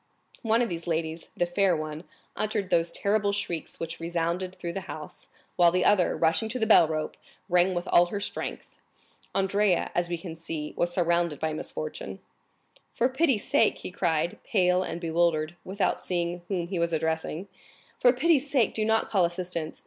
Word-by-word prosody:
One 225 +1 +2
of 235 - -2
these 170 0 -5
ladies, 160 0 -2
the 175 - +2
fair 180 0 +2
one, 155 +2 -5 0.3
uttered 205 -3 -2
those 170 -1 +2
terrible 205 +2 +1
shrieks 175 -5 -4
which 165 0 -5
resounded 170 +2 -2
through 170 -1 -4
the 190 0 -6
house, 155 -1 -9 0.3
while 175 -1 +7
the 180 +1 +1
other, 190 -4 +3
rushing 165 +7 +1
to 245 - -3
the 220 - +1
bell 195 -7 +7
rope, 155 -1 -3 0.3
rang 180 0 +3
with 175 - -3
all 175 0 +5
her 200 +3 -3
strength. - - -5 0.6
Andrea, 195 -1 +2
as 175 0 0
we 175 - -1
can 165 -1 -7
see, 160 -2 -5
was 175 - 0
surrounded 170 -3 +1
by 160 -1 -1
misfortune. 155 -10 -5 0.8
"For 245 - +2
pity's 265 -5 +1
sake," - - +3
he - - -7
cried, 170 -2 0
pale 180 -3 +2
and 170 -2 -4
bewildered, 165 -1 +1
without 190 0 -1
seeing 175 -1 -2
whom 180 -4 -1
he 185 -3 -2
was 170 0 0
addressing,—"for 160 +9 -1
pity's 290 +2 +2
sake 260 -6 +2
do 220 - 0
not 220 +1 +2
call 195 -4 +2
assistance! 175 -2 -4
175 Hz, 175 wpm, -27 LUFS, 165-200 Hz, 0.8 s, while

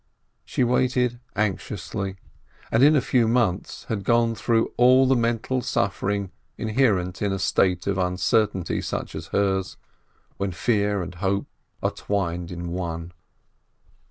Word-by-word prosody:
She - - -1
waited 125 0 +1 0.2
anx 105 -2 -1
iously, 95 -1 -4 0.6
and 115 - +3
in 150 +3 +7
a 140 - +4
few 120 -3 +3
months 110 -6 0
had 105 -3 -3
gone 115 0 +3
through 115 0 0
all 130 +2 +6
the 130 0 +4
mental 120 +2 0
suffering 100 -3 -1 0.3
inherent 105 -6 +1
in 100 -1 +1
a 95 - -1
state 95 -1 +1
of 95 -1 0
uncertainty 95 +1 +1
such - - -4
as - - -6
hers, 95 -2 0 0.6
when 100 -2 -2
fear 100 -1 +1
and 90 +1 -7
hope 95 +2 -1 0.4
are - - +2
twined 90 -4 -2
in 85 -1 -5
one. 85 -1 -4
100 Hz, 140 wpm, -24 LUFS, 95-120 Hz, 0.6 s, in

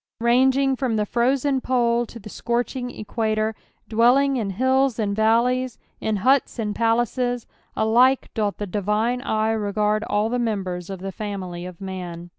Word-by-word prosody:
Ranging 265 +3 +3
from 255 -4 -1
the 210 -1 +1
frozen 260 +4 +1
pole 240 -2 +1
to 235 - -11
the 215 - -11
scorching 240 +3 -2
equator, 220 -1 -2 0.3
dwelling 250 +5 +4
in 220 -6 -1
hilTs 260 +3 +2
and 205 -3 -1
valleys, 235 +3 +2 0.2
in 220 - -1
huts 270 +1 +3
and 210 -3 -2
palaces, 240 +1 0 0.3
alike 245 +4 +3
doth 210 -3 -1
the 205 - -3
divine 210 +5 0
eye 220 -4 0
regard 210 0 0
all 205 +1 +1
the 245 +2 -1
members 190 -6 -2
of 190 -2 -6
the 195 0 -4
family 185 -4 -5
of 180 -2 -11
man. 180 -3 -6
225 Hz, 155 wpm, -23 LUFS, 210-250 Hz, 0.3 s, dwelling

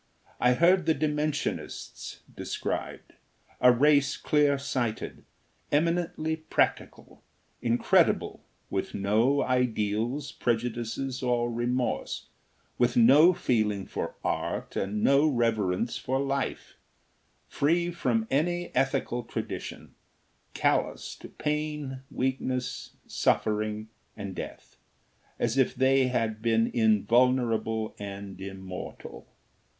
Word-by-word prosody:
I 125 0 +4
heard 170 +4 +4
the 160 - +4
Dimensionists 150 0 -3
described: - - -4 0.5
a 125 - +7
race 140 +2 +3
clear 145 -2 +2
sighted, 125 -5 -3 0.5
eminently 160 0 0
practical, 160 - -2 0.4
incredible; 120 0 +2 0.3
with - - -2
no 110 +8 +2
ideals, 125 +2 0
prejudices, 120 +2 -2
or 120 -1 +1
remorse; 120 +2 -2 0.5
with 120 0 +2
no 140 +9 +7
feeling 110 - 0
for - - -4
art - - -2
and 105 +2 -2
no 140 +3 +5
reverence 115 -5 0
for 130 +1 -1
life; 140 0 -3 0.7
free 170 +4 +1
from 125 -10 0
any 175 +5 0
ethical 135 -2 0
tradition; 115 - -6 0.6
callous - - 0
to - - -11
pain, 150 -3 -3
weakness, 130 -1 -2
suffering 110 0 0 0.3
and 100 -2 -5
death, - - -8 0.6
as 120 +3 0
if 130 -1 +2
they 130 0 +3
had 115 -4 -1
been 115 0 +2
invulnerable 115 0 +2
and 100 -1 -7
immortal. 95 -1 -8
125 Hz, 95 wpm, -28 LUFS, 110-140 Hz, 0.7 s, a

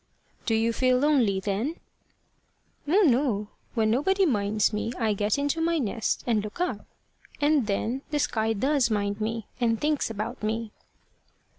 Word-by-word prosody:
"Do 225 - +3
you 225 +1 +1
feel 255 +1 +3
lonely, 250 -9 +3
then?" 210 - -2 1.1
"Oh, 385 +8 +4
no! 235 -6 +1 0.3
When 220 -2 +2
nobody 385 - +2
minds 210 - +1
me, 215 +2 -2
I 225 -3 +1
get 205 +3 0
into 285 +3 0
my 335 0 +2
nest, 225 -5 -1
and 220 -4 +1
look 210 +9 -8
up. 345 - -2 0.5
And 290 -5 +2
then 225 +5 -1
the 300 - -1
sky 225 -6 0
does 265 +3 +1
mind 205 -1 -1
me, 225 0 -2
and 230 -2 +1
thinks 300 -4 0
about 215 -1 -5
me." 220 +1 -2
230 Hz, 155 wpm, -26 LUFS, 215-285 Hz, 1.1 s, Oh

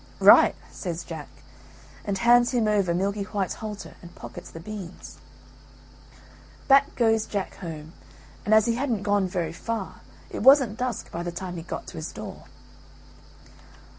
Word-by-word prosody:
"Right," - - +8 0.2
says 170 -3 -5
Jack, 160 -4 -7 0.8
and 200 -1 -2
hands 240 +4 +4
him 230 -3 +2
over 200 -4 +2
Milky 200 +4 0
white's 200 -1 -2
halter 210 -2 -7
and 170 -1 -13
pockets - - -9
the 165 - -10
beans. 190 -1 -9 1.5
Back 275 +1 +5
goes 225 -2 +2
Jack 200 -3 -3
home, 160 -3 -8 0.5
and 210 - -2
as 215 0 +6
he 235 - +2
hadn't 235 -5 -1
gone 205 -2 +2
very 170 -3 -2
far 225 +2 -5 0.3
it - - -4
wasn't 260 -3 +6
dusk 250 -3 -3
by 170 - -4
the 175 0 -3
time 180 +1 -6
he 170 - -5
got 160 - -6
to - - -10
his - - -5
door. - - -9
200 Hz, 155 wpm, -26 LUFS, 175-225 Hz, 1.5 s, Right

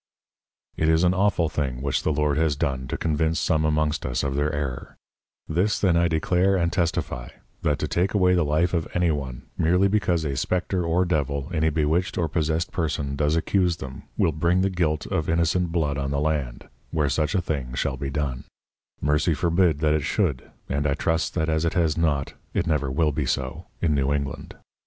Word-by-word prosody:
It 80 - +2
is 80 +1 +4
an 90 0 +4
awful 95 -3 +2
thing 70 -5 -2
which 70 -2 0
the - - 0
Lord 75 -1 +1
has 80 -1 +1
done 65 -2 -2
to 80 - -3
convince 80 0 0
some 80 -1 +1
amongst 75 -1 +1
us 60 - -1
of 70 -1 -1
their 75 +1 +1
Error: 70 -4 -4 0.5
This 90 +6 +1
then 90 -4 +2
I 85 0 +3
declare 90 +4 +2
and 85 -1 +1
testifie, 85 -8 -1 0.3
that 75 -1 +1
to - - -2
take 90 +4 0
away 90 -2 +4
the 90 -2 +3
Life 80 +4 +1
of 85 -2 0
any 90 -2 +3
one, 65 -5 -4 0.2
meerly 90 +4 +4
because 90 -5 +1
a 70 -2 -2
Spectre 90 +5 -1
or 85 +2 +2
Devil, 70 -3 -1
in 80 -3 0
a 80 - +4
bewitched 80 +3 0
or 85 - +1
possessed 80 +2 -1
Person 75 -5 -2
does 75 +2 +1
accuse 90 +1 +1
them, 65 -4 -8 0.2
will - - +3
bring 85 +4 +1
the 95 +1 +1
Guilt 80 -4 0
of 80 - -2
innocent 85 +1 +1
Blood 75 -4 0
on 70 0 -2
the 70 0 -1
Land, 75 -5 -2 0.2
where 75 -3 0
such 75 +7 0
a - - +3
thing 70 -7 -3
shall 65 - -1
be 70 +1 -4
done: 70 -3 -3 0.6
Mercy 75 +2 +2
forbid 85 -2 +2
that 75 -1 +3
it 75 - +1
should, 80 - -1 0.2
(and 70 +2 0
I 70 - +1
trust 80 +1 -1
that 80 - 0
as 80 0 +1
it 85 - 0
has 80 -4 +2
not 75 -5 0 0.2
it - - +1
never 75 -5 0
will 75 +3 +1
be 70 - -2
so) - - -3 0.2
in 80 -3 +3
New 70 -1 +1
England. 70 -1 -3
80 Hz, 210 wpm, -24 LUFS, 70-85 Hz, 0.6 s, is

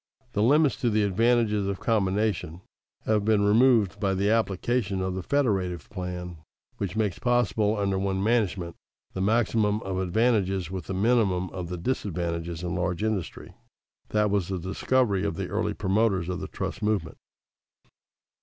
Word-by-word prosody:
The 105 - 0
limits 145 +4 +4
to 120 - 0
the 110 -1 +2
advantages 105 0 +2
of 100 -1 -3
combination 100 -5 0 0.4
have 110 -2 +2
been 105 -1 +3
removed 110 -3 +4
by 95 -2 0
the 100 +2 +1
application 110 -1 0
of 95 0 -2
the 95 - -3
federative 95 - -1
plan 90 -2 -5 0.4
which 100 -1 -3
makes 105 -5 -1
possible 115 -3 +1
under 100 -1 0
one 95 0 -1
management 100 -7 0 0.4
the 95 - -3
maximum 105 0 +2
of 95 -1 -3
advantages 95 -2 +1
with 95 -4 -5
the 95 - -4
minimum 95 -4 +1
of 90 -2 -6
the 90 - -4
disadvantages 85 -5 -3
in 85 -1 -2
large 90 +2 -1
industry. 110 -6 -3 0.6
That 105 -1 +1
was 100 -4 +1
the 95 - -2
discovery 100 +3 0
of 100 -5 -1
the - - -4
early - - -1
promoters 95 -3 +1
of 90 -1 -3
the 95 - -5
trust 95 +3 -5
movement. 105 -7 -1
100 Hz, 155 wpm, -26 LUFS, 90-110 Hz, 0.6 s, limits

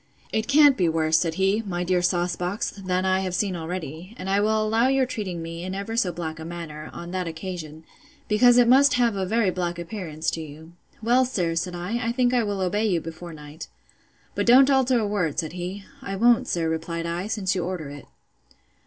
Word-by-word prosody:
It 220 +1 0
can't 290 -1 +6
be 175 -3 +2
worse, 160 0 +2
said 165 -2 -1
he, 195 +4 +2
my 180 -5 -3
dear 180 0 +1
sauce 175 0 +1
box, 180 +5 -2
than 185 -2 -2
I 190 0 +2
have 185 -2 -2
seen 190 0 0
already; 170 +3 -6
and 190 +1 -4
I 200 - +3
will 215 +1 +2
allow 225 +3 +2
your 270 0 +3
treating 190 -9 -4
me 165 +1 -6
in 185 +1 -4
ever 200 +3 -4
so 195 -6 +1
black 165 -2 -5
a - - -6
manner, 160 -2 -7
on 170 0 -8
that 185 -1 -2
occasion, 160 -2 -7 0.4
because 245 +3 +5
it 245 -1 +6
must 275 +3 +6
have 240 -4 +2
a 190 -1 -2
very 220 -1 +2
black 175 -1 -3
appearance 170 -3 -4
to 165 - -4
you.—Well, 170 - -2
sir, 180 -10 -1
said 175 +2 -2
I, 205 +8 -3
I 230 +1 -1
think 245 0 +2
I 245 - +3
will 205 -2 -2
obey 205 +4 +1
you 180 -5 +1
before 165 +2 -8
night. 150 0 -10 0.7
But - - -2
don't 265 +3 +7
alter 260 -2 +3
a 220 - +1
word, 200 -8 -1
said 160 -2 -2
he. 180 +3 -5 0.2
I 195 -6 -4
won't, 235 +3 +4
sir, 165 -2 0
replied 165 +1 -3
I, 170 +3 -3
since 205 -4 -1
you 180 -3 -1
order 175 -4 -4
it. 145 0 -11
185 Hz, 215 wpm, -24 LUFS, 170-220 Hz, 0.7 s, don't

